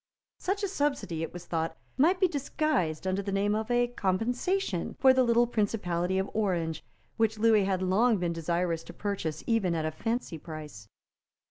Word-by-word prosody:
Such 395 +3 -1
a - - +2
subsidy, 285 - -1
it 165 - -3
was 175 0 -9
thought, 165 -1 -2 0.2
might 340 +7 +3
be 375 - +5
disguised 280 - -1
under 190 +1 0
the 200 0 -4
name 200 +1 +1
of 220 +2 -2
a 245 0 +3
compensation 240 - -1
for 265 -1 +7
the 260 - +4
little 235 -1 +4
principality 190 -6 0
of 190 +1 0
Orange, 170 -7 -1 0.3
which 220 -1 +2
Lewis 215 -2 +4
had 190 -1 0
long 215 +5 +3
been 175 -2 -1
desirous 170 0 -1
to - - -10
purchase 165 -7 -3
even 200 -7 +1
at 160 -1 -1
a 155 - -1
fancy 225 -1 -3
price. 150 -10 -9
200 Hz, 175 wpm, -29 LUFS, 170-240 Hz, 0.3 s, for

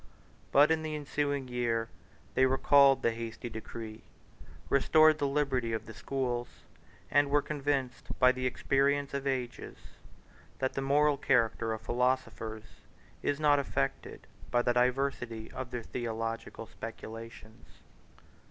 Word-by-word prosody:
But 145 +3 +6
in 160 0 +2
the 155 -1 -3
ensuing 145 -2 -2
year 120 -2 -1 0.5
they 130 +1 +4
recalled 135 +1 +5
the 115 - +3
hasty 115 +1 -6
decree, 110 0 -8 0.7
restored 155 +3 +5
the 145 - +1
liberty 135 -5 0
of 110 - -3
the 110 - -9
schools, 120 +2 -2 0.6
and 145 0 +4
were 145 0 +3
convinced 140 -4 -2
by 125 0 +6
the 130 0 -2
experience 140 +2 +1
of 140 0 -2
ages, 130 -2 -3 0.8
that 130 - -1
the 135 - -2
moral 145 +1 +3
character 115 -4 +1
of 110 0 -3
philosophers 115 -3 -1 0.6
is 145 0 -1
not 145 -2 +4
affected 70 - -3 0.2
by 120 0 +2
the 120 - +2
diversity 125 -2 0
of 130 -1 -6
their 125 -2 -5
theological 115 -1 -4
speculations. 115 0 -10
125 Hz, 130 wpm, -31 LUFS, 115-140 Hz, 0.8 s, But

